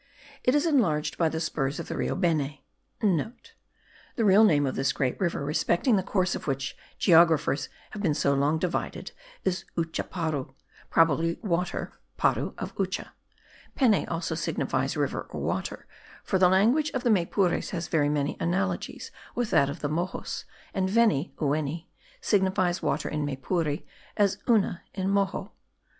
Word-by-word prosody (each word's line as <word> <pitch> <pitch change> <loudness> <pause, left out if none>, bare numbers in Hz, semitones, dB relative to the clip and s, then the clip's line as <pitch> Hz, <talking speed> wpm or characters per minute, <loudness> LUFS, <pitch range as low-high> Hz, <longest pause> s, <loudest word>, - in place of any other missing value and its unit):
It 250 - +3
is 295 - +3
enlarged 200 - +2
by 165 -2 +3
the 160 - -3
spurs 150 -3 -2
of - - -5
the - - -4
Rio - - -1
Beni,* 155 -6 0 0.2
(* - - -45
The 210 - +1 0.9
real 200 +2 +7
name 150 -9 +4
of 130 - -1
this 135 0 0
great 130 -3 -1
river, 170 -6 -1
respecting 170 - +2
the 190 - +2
course 185 -1 0
of - - -6
which 135 -1 -2 0.2
geographers 160 -5 +4 0.2
have 210 - -6
been 160 -7 +1
so 140 -2 +2
long 145 +3 +2
divided, 175 +2 -3 0.3
is 190 -1 -1
Uchaparu, 160 -4 -2 0.3
probably 165 +1 +3
water 180 -2 -1 0.2
(para) - - +1
of - - -5
Ucha; - - -2 0.7
Peni 235 -7 +3
also 170 +1 -2
signifies - - -1
river - - -1
or - - -6
water; - - -3 0.4
for 190 - 0
the 180 -1 +6
language 235 +12 +3
of 255 - -1
the 240 - +3
Maypures 180 -1 +1
has 170 -2 -3
very 145 -2 +2
many 145 0 0
analogies 190 +3 -2 0.2
with 240 -3 -1
that 140 - +4
of 140 - -6
the 145 - 0
Moxos; 170 +5 -3 0.3
and 190 -1 0
veni 210 -7 +3
(oueni) 155 +2 -1 0.3
signifies 190 -3 +1
water - - -1
in 150 -1 -2
Maypure, 145 +2 -1 0.3
as 205 -2 +2
una 205 -6 +3
in 190 0 -1
Moxo. 200 -1 0
170 Hz, 155 wpm, -27 LUFS, 150-195 Hz, 0.9 s, real